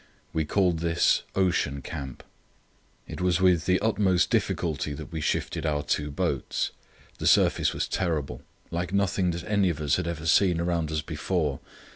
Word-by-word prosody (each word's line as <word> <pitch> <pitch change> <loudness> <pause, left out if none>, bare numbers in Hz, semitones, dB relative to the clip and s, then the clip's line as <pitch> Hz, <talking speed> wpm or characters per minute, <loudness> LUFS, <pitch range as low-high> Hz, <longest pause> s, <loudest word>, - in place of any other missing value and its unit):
We 80 -1 0
called 90 -1 +1
this 85 0 +2
"Ocean 85 -7 +1
Camp." 65 0 -7 0.8
It - - -7
was 90 -1 +2
with 90 -3 +3
the 90 0 +3
utmost 100 -5 +2
difficulty 75 -3 0
that - - -8
we 80 - -4
shifted 75 - -1
our 75 -2 0
two 75 0 -1
boats. 70 - -1 0.5
The - - -1
surface - - +4
was - - -2
terrible—like 85 +1 -3
nothing 100 -2 +1
that 85 0 -3
any 100 -3 +2
of 80 -4 -3
us 75 -2 +1
had - - -2
ever 80 -2 -4
seen 85 +1 +4
around 85 -2 -1
us 75 0 -1
before. 75 -3 -2
85 Hz, 160 wpm, -27 LUFS, 75-90 Hz, 0.8 s, surface